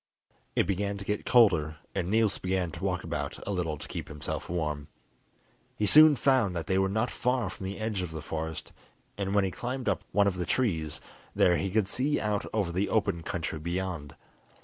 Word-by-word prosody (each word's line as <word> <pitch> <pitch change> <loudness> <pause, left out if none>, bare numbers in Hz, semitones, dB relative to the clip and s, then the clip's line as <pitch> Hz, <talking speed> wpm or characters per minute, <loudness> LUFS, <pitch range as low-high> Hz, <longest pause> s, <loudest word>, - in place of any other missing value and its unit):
It - - +3
began 100 +2 -1
to 100 - -8
get 105 +1 -2
colder, 85 -11 +4 0.2
and 90 - -2
Niels 110 -1 +2
began 90 -2 -1
to 85 +4 -8
walk 90 -3 -1
about - - -3
a - - -2
little 85 -5 -1
to - - -9
keep - - -5
himself 75 -1 -5
warm. 75 -4 -2 0.9
He 105 - 0
soon 155 +5 +8
found 130 -9 +2
that 85 - -2
they 95 0 +1
were 95 0 +2
not 110 +5 0
far 125 -6 0
from 95 - -6
the 95 - -5
edge 110 -3 -2
of 90 - -3
the 80 -2 -7
forest, 80 0 -5 0.4
and 100 0 -2
when 100 - +4
he 95 - -1
climbed 125 +3 -4
up 100 - 0
one 100 +1 +4
of 95 -2 0
the 90 - -2
trees 80 - 0 0.3
there 90 - +5
he 95 - -1
could 105 0 +1
see 135 +7 0
out 105 -1 -1
over 100 -6 0
the 95 +4 0
open 90 -6 +1
country 80 -2 -3
beyond. 85 -3 -4
95 Hz, 205 wpm, -29 LUFS, 85-105 Hz, 0.9 s, soon